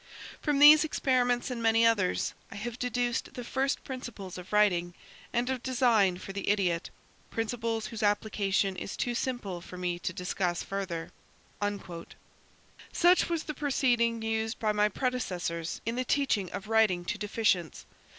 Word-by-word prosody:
"From 295 -2 +1
these 300 +2 +9
experiments 250 -5 +1
and 240 -2 -4
many 225 0 +4
others, 205 -6 +2 0.2
I - - -10
have 235 +4 -5
deduced 245 +1 -1
the 250 - -5
first 265 +3 -1
principles 240 -8 -7
of 180 0 -9
writing 175 -5 +2 0.4
and 240 +1 0
of 260 -2 -2
design 235 -8 +3
for 195 +1 -8
the 200 0 -3
idiot; 185 -5 +1 0.4
principles 225 0 -2
whose 225 - -6
application 205 -2 +1
is 190 - -6
too 245 - -1
simple 235 -8 -3
for 180 - -10
me 175 -1 -2
to 185 - -3
discuss 180 0 -2
further." 180 -4 -4 1.8
Such 355 +1 +4
was 335 -2 -1
the 305 - -5
proceeding 240 -6 +1
used 225 0 -1
by 215 -1 +1
my 210 0 +2
predecessors 180 -9 -3
in 230 +2 -2
the 255 - +1
teaching 240 -8 0
of 200 - -6
writing 215 -6 +3
to 210 - -3
deficients. 205 - 0
220 Hz, 150 wpm, -29 LUFS, 190-245 Hz, 1.8 s, these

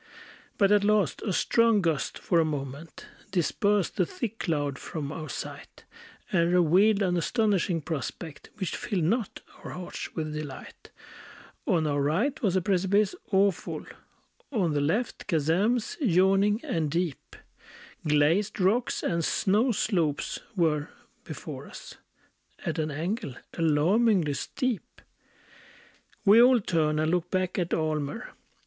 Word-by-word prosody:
But 200 -1 +4
at 205 -1 +5
last 210 -1 +2
a 215 - -2
strong 230 +3 +3
gust 165 -6 -1
for 170 - +1
a - - +4
moment 145 +1 -5 0.2
Dispersed 200 +1 +1
the - - +3
thick 240 - -5
cloud 145 -5 -1
from 150 -3 -5
our 155 -1 -6
sight, - - -8 0.5
And 170 -2 +2
revealed 185 +5 +4
an 180 -2 +1
astonishing 195 -3 +1
prospect, 155 +1 -6
Which 190 -5 -3
filled 195 -6 -2
not 220 +6 -1 0.2
our - - -7
hearts 180 -1 -7
with 155 -2 -3
delight: 150 -3 -8 0.8
On 165 -3 +2
our 145 -1 0
right 200 - 0
was 195 -6 +1
a 185 - +1
precipice 195 +2 +2 0.2
awful; 195 -2 +1 0.7
On 185 - +1
the 145 - +1
left 210 +12 -1
chasms 195 - +1
yawning 195 - +3
and 165 - -1
deep; 170 -2 -3 0.7
Glazed 160 +9 +2
rocks 210 +7 +1
and 170 -1 0
snow 210 - +2
slopes 175 -9 -1 0.2
were 155 -5 +1 0.3
before - - -8
us, - - -11 0.7
At - - -2
an 155 0 -1
angle 155 - -3 0.2
alarmingly 170 +2 +3
steep. 250 - -3 1.3
We 210 +3 +8
all 250 0 +6
turned 155 -6 0
and 155 +1 +1
looked 180 -1 0
back 185 0 -1
at 175 -1 -2
Almer. 155 - -2
180 Hz, 130 wpm, -27 LUFS, 155-210 Hz, 1.3 s, We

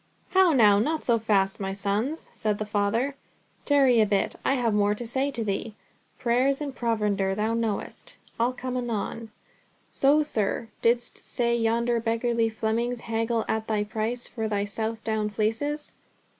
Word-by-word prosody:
"How 380 -2 +5
now, 210 -7 +5
not 310 +8 -1
so 235 -2 +3
fast, 195 -3 +1
my 195 -1 -3
sons," 205 +10 -2
said 215 -2 -1
the 215 - -3
Father; 210 +6 0 0.5
"tarry 270 -5 +5
a 215 - +3
bit, 200 -1 0
I - - +2
have 235 -4 +1
more 205 0 +2
to 240 - -6
say 265 +4 0
to 240 -5 -2
thee. 210 +1 -3 0.4
Prayers 255 +3 +2
and 285 -3 -5
provender, 210 -4 0
thou 215 +2 0
knowst—I'll 230 +2 -3
come 255 0 -5
anon. 230 -2 -3 0.6
So, 290 +3 +4
sir, 225 -4 -2
didst 240 +1 0
say 235 -1 0
yonder 235 +1 +1
beggarly 230 0 +1
Flemings 230 +2 -1
haggle 225 0 -1
at 220 0 -1
thy 215 -1 +1
price 220 +3 -3
for 225 -2 -3
thy 205 -1 -1
Southdown 220 0 -2
fleeces. 225 +9 -2
225 Hz, 155 wpm, -26 LUFS, 210-245 Hz, 0.6 s, How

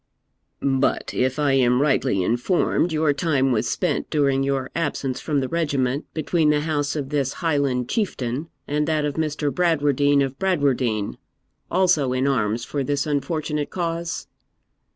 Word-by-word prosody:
'But, 135 -1 +1
if 130 +2 0
I 145 -2 +2
am 125 -2 +3
rightly 135 -8 +2
informed, 125 - +1
your 155 -2 +2
time 140 -4 +1
was 115 - 0
spent, - - -1
during 140 -3 +2
your 135 -1 -1
absence 145 -5 -2
from 145 -3 0
the 130 - -2
regiment, 140 -4 -1
between 160 0 +1
the 150 0 +2
house 145 -2 -1
of 140 -3 -3
this 140 -3 0
Highland 140 -7 0
Chieftain 145 - -2 0.2
and 150 +1 0
that 155 -2 +1
of 145 - -1
Mr. 150 -1 -1
Bradwardine 145 -5 +2
of 135 0 -4
Bradwardine, 130 - 0 0.5
also 170 -8 +2
in 130 +2 +1
arms 115 -3 0
for 140 -2 -2
this 140 +1 -1
unfortunate 150 0 -2
cause?' 170 -1 -3
145 Hz, 150 wpm, -23 LUFS, 130-155 Hz, 0.5 s, am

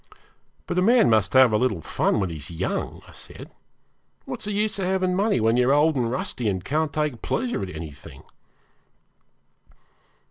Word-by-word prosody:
'But 175 - -1
a - - +2
man 230 - +4
must 105 -3 +2
have 130 -4 +6
a - - +4
little 110 -8 0
fun - - 0
when 95 -4 -1
he 80 - -6
is 75 - -7
young,' 85 - -4
I - - -14
said. - - -12 0.7
'What's - - -6
the 210 - -3
use 210 +1 -1
of 190 - -1
having 185 -1 0
money 205 - +1
when 115 +2 +2
you're 125 +2 +3
old 150 +2 +3
and 120 -3 0
rusty, 120 -2 -2
and 95 -1 -3
can't 155 +2 0
take 150 -6 -2
pleasure 245 0 -2
in 95 - -4
anything?' 80 -4 -10
130 Hz, 180 wpm, -24 LUFS, -, 0.7 s, have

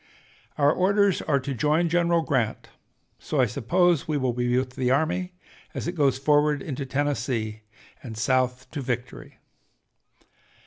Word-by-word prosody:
Our 145 +1 +4
orders 200 0 +2
are 140 -3 +1
to 135 +2 -4
'join 150 +7 +1
General 170 0 +2
Grant,' 125 -8 -1 0.5
so 150 - -3
I 130 - +5
suppose 160 - +1
we 155 -2 0
will 130 -3 0
be 125 0 0
with 130 0 -1
the 125 0 -1
army 165 +7 0 0.4
as - - -4
it - - 0
goes 140 -7 +1
forward 150 +1 +2
into 140 -2 -5
Tennessee 130 -6 -2 0.4
and 115 -3 -8
South 130 +1 0
to 145 - -4
victory. 125 -1 -5
140 Hz, 145 wpm, -25 LUFS, 125-160 Hz, 0.5 s, I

